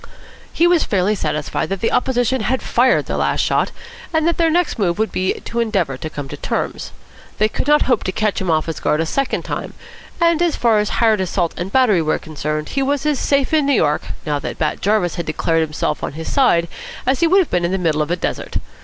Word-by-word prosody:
He 335 - +2
was 345 -2 +4
fairly 195 +1 +1
satisfied 155 -7 -2
that 195 0 -2
the 225 - 0
opposition 250 0 +1
had 255 +4 -1
fired 255 +2 +2
their - - -3
last - - +1
shot, - - +1 0.4
and 320 -1 +1
that 340 - +1
their 330 -1 +3
next 345 -6 0
move 175 -4 +1
would 220 +1 0
be 185 0 0
to 235 - -4
endeavour 195 - 0
to 155 +5 -6
come 145 -2 -6
to - - -7
terms. - - -3 0.5
They 215 - +3
could 220 - -4
not 295 0 +5
hope 250 -4 +1
to 185 - 0
catch 215 +1 -1
him 185 - -2
off 155 -1 +2
his 165 - -4
guard 150 - +1
a 165 - +1
second 275 +11 -1
time, - - -5 0.4
and, 335 -1 +3
as 345 -2 +2
far 230 -3 +3
as 210 - 0
hired 220 -4 +2
assault 175 -2 -1
and 180 +3 -5
battery 230 -9 +4
were 155 -1 0
concerned, 150 0 -4
he 275 - -1
was 280 +1 0
as 300 -3 +1
safe 280 +1 +1
in 305 -3 +3
New 285 - +3
York, 150 - +2 0.2
now 150 -2 -1
that - - -5
Bat 155 -1 -1
Jarvis 200 -4 +1
had 170 - -4
declared 165 +1 0
himself 150 -1 -2
on - - -3
his 160 +2 -5
side, 170 -12 +3 0.4
as 260 +1 +1
he 335 - +4
would 370 +4 +4
have 375 -5 +2
been 180 -1 +1
in 170 - 0
the 190 - +1
middle 160 -4 0
of 150 - -2
a 175 - +1
desert. 180 - -3
210 Hz, 240 wpm, -19 LUFS, 165-265 Hz, 0.5 s, not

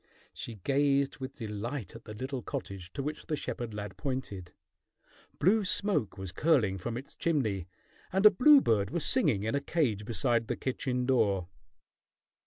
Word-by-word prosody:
She 115 - -6
gazed 140 +6 +1
with 130 0 -6
delight 110 0 -5
at 115 - -11
the 105 - -8
little 130 +3 -4
cottage 95 -5 -6
to 140 - -3
which 150 +2 -5
the 155 - 0
shepherd 120 -5 -4
lad 105 0 -6
pointed. 130 -10 -4 0.9
Blue 205 +7 +3
smoke 195 - 0
was 95 -2 -6
curling 110 - +2
from 115 +6 -4
its 135 - -9
chimney, 110 - 0 0.4
and 190 +3 +1
a 210 - +11
bluebird 190 - +5
was 170 +3 -1
singing 145 - +2
in 110 - -1
a 140 - +1
cage 140 - 0
beside 115 0 0
the - - -1
kitchen 125 -1 -2
door. 100 -9 +2
125 Hz, 160 wpm, -30 LUFS, 105-145 Hz, 0.9 s, a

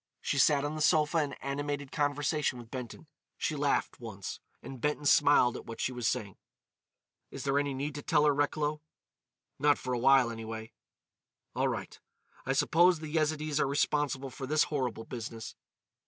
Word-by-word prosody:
She 140 - -1
sat 145 0 +4
on 145 - -2
the 155 - -4
sofa 155 +1 +3
in 145 -2 -1
animated 145 0 -4
conversation 145 -1 0
with 120 -1 -11
Benton. 130 +3 -7 0.3
She 155 - -1
laughed 145 -1 0
once, 100 -5 -7 0.2
and 135 -3 -9
Benton 150 0 -1
smiled 145 -4 +5
at - - -8
what 115 - -8
she - - 0
was 120 -3 -2
saying. 100 -3 -2 0.9
"Is - - -7
there 140 +1 +2
any 145 -1 -1
need 140 +3 -3
to 145 - -6
tell 150 0 +2
her, 145 - +5
Recklow?" 150 +1 0 0.8
"Not 145 +1 +4
for 125 - -4
a 120 - 0
while, 130 -1 +5
anyway." 110 0 -7 0.8
"All - - +1
right. - - -4 0.5
I - - +2
suppose 175 +2 +4
the 155 -1 -8
Yezidees 155 -1 0
are - - +2
responsible 140 -1 0
for 130 - -6
this 150 +2 +3
horrible 125 -6 -2
business." 115 -2 -7
145 Hz, 170 wpm, -30 LUFS, 125-150 Hz, 0.9 s, smiled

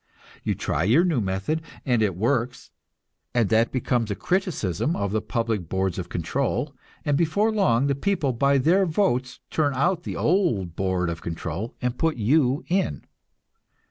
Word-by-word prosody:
You - - 0
try 80 +5 -1
your 140 - +4
new 160 -9 +1
method, 95 +11 -1 0.2
and 120 -5 +2
it 100 -5 +1
works, 120 +4 -1 0.6
and 115 -4 +3
that 115 +1 +3
becomes 125 -3 0
a 100 - -1
criticism 160 - -1
of 100 -1 -2
the 110 0 0
public 115 -8 -2
boards 95 -1 -1
of 90 - -5
control, 130 - -1 0.3
and 145 -2 +2
before 170 +8 +2
long 140 - +3
the 140 - +2
people 145 -2 0
by 140 +4 +3
their 180 +8 +3
votes 130 -8 0
turn 145 -3 +1
out 175 +6 +1
the - - -5
old 150 - +1
board 95 -2 0
of 85 - -6
control 85 +6 -5
and 125 0 -1
put 160 -1 +1
you 130 +4 +2
in. 190 +2 -1
125 Hz, 165 wpm, -25 LUFS, 100-160 Hz, 0.6 s, your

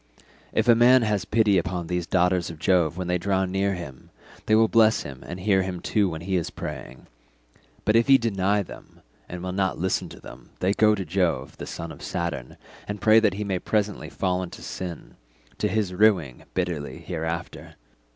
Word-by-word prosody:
If 110 - 0
a 120 - +8
man 120 +2 +6
has 105 -3 0
pity 105 -3 +3
upon 85 0 -3
these 90 0 -2
daughters 90 -1 +2
of 80 - -8
Jove 85 -1 +2
when 90 - -3
they 90 0 0
draw 95 +1 +1
near 95 +1 0
him, 70 -7 -9 0.4
they 110 - +5
will 110 0 +5
bless 110 0 +4
him 65 -2 -9
and 90 +2 -6
hear 95 0 +2
him 95 -1 -4
too 100 +2 +1
when 80 -1 -6
he 95 +2 -1
is 85 - -2
praying; - - -8 0.8
but 110 - +3
if 115 0 +4
he 135 -1 +8
deny 100 -4 +1
them - - -13 0.3
and 90 0 -6
will 90 - -3
not 95 -4 0
listen - - -1
to - - -12
them, - - -13
they 95 +2 +2
go 105 0 +4
to 95 -2 -4
Jove 85 -7 -1
the - - -7
son 85 0 -6
of 75 - -12
Saturn 75 -8 -4 0.3
and 105 0 -4
pray 110 +3 +6
that 105 -4 +2
he 105 - -3
may 95 -3 -1
presently 105 +2 -1
fall 90 -1 -1
into 90 - -8
sin—to - - -7
his 105 -4 -1
ruing 90 - +2
bitterly 85 -5 -2
hereafter. 85 0 -5
95 Hz, 195 wpm, -25 LUFS, 85-105 Hz, 0.8 s, a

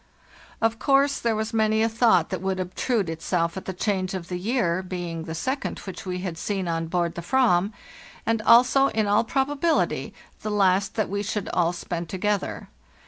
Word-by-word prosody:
Of 225 0 +2
course 275 0 +3
there 230 -2 0
was 220 +1 -3
many 220 0 +2
a - - +3
thought 225 -7 +3
that 185 -3 -3
would 190 0 -1
obtrude 185 +3 -1
itself 165 +1 -1
at 190 - -6
the - - -3
change 190 0 -1
of 175 -2 -6
the 180 -1 -3
year, 190 -4 0
being 175 -3 -5
the 160 - -5
second 260 - -2
which 190 0 -8
we 180 0 -3
had 175 -4 -4
seen 195 -2 -2
on 165 -1 -1
board 170 0 0
the 170 - -6
"vam, 205 -2 +2 0.5
and 225 0 +1
also, 250 +4 +6
in 220 -4 0
all 205 +2 +3
probability, 280 +6 0 0.3
the 215 - -3
last 195 0 +2
that 215 -3 0
we 200 +1 -2
should 205 -1 -3
all 170 -1 +2
spend 175 -1 -5
together. 200 +1 -2
195 Hz, 190 wpm, -25 LUFS, 180-225 Hz, 0.5 s, also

